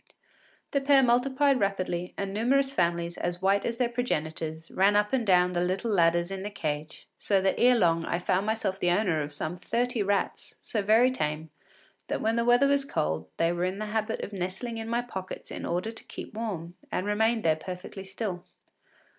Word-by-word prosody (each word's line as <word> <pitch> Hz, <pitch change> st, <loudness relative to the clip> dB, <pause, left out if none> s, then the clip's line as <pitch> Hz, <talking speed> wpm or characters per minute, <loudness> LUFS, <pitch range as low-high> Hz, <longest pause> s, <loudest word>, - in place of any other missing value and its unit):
The 280 Hz, -, +1 dB
pair 275 Hz, -1 st, +5 dB
multiplied 260 Hz, +3 st, +3 dB
rapidly, 185 Hz, -3 st, -1 dB
and 195 Hz, -1 st, -3 dB
numerous 265 Hz, +6 st, +2 dB
families, 170 Hz, -6 st, 0 dB
as 175 Hz, 0 st, -2 dB
white 195 Hz, +1 st, +2 dB
as 235 Hz, 0 st, -3 dB
their 250 Hz, -1 st, +2 dB
progenitors, 160 Hz, -9 st, -3 dB
ran 200 Hz, +2 st, +3 dB
up 210 Hz, +2 st, +2 dB
and 245 Hz, -5 st, +1 dB
down 180 Hz, -1 st, +4 dB
the 175 Hz, -1 st, 0 dB
little 190 Hz, +6 st, -1 dB
ladders 170 Hz, -1 st, +3 dB
in 195 Hz, -1 st, -4 dB
the 205 Hz, -, -4 dB
cage, 155 Hz, -6 st, -5 dB
so 200 Hz, -2 st, +2 dB
that 190 Hz, 0 st, +2 dB
ere 250 Hz, +1 st, +6 dB
long 165 Hz, -5 st, +3 dB
I -, -, -1 dB
found 185 Hz, +3 st, 0 dB
myself 220 Hz, -3 st, -1 dB
the 175 Hz, -, +2 dB
owner 175 Hz, -4 st, +2 dB
of 145 Hz, 0 st, -4 dB
some 155 Hz, +4 st, -4 dB
thirty 235 Hz, +4 st, -1 dB
rats 200 Hz, 0 st, -1 dB
so 215 Hz, -, -2 dB
very 225 Hz, +5 st, +4 dB
tame 155 Hz, -, -3 dB, 0.6 s
that -, -, -2 dB
when 225 Hz, +1 st, +1 dB
the 235 Hz, 0 st, +1 dB
weather 245 Hz, +3 st, +5 dB
was 280 Hz, 0 st, +3 dB
cold 80 Hz, -, -2 dB
they 165 Hz, +1 st, +2 dB
were 175 Hz, 0 st, -2 dB
in 185 Hz, +2 st, -1 dB
the 215 Hz, -, -3 dB
habit 220 Hz, 0 st, -1 dB
of 205 Hz, -, -6 dB
nestling 195 Hz, +5 st, -4 dB
in 225 Hz, 0 st, -5 dB
my 235 Hz, +1 st, 0 dB
pockets 190 Hz, -6 st, -7 dB
in -, -, -5 dB
order 180 Hz, +6 st, -1 dB
to 225 Hz, -, -9 dB
keep -, -, -8 dB
warm, 195 Hz, -7 st, -4 dB, 0.2 s
and 185 Hz, -, -1 dB
remained 220 Hz, +2 st, +1 dB
there 160 Hz, -1 st, +3 dB
perfectly 180 Hz, +3 st, -7 dB
still. 190 Hz, -2 st, -5 dB
195 Hz, 200 wpm, -28 LUFS, 175-230 Hz, 0.6 s, ere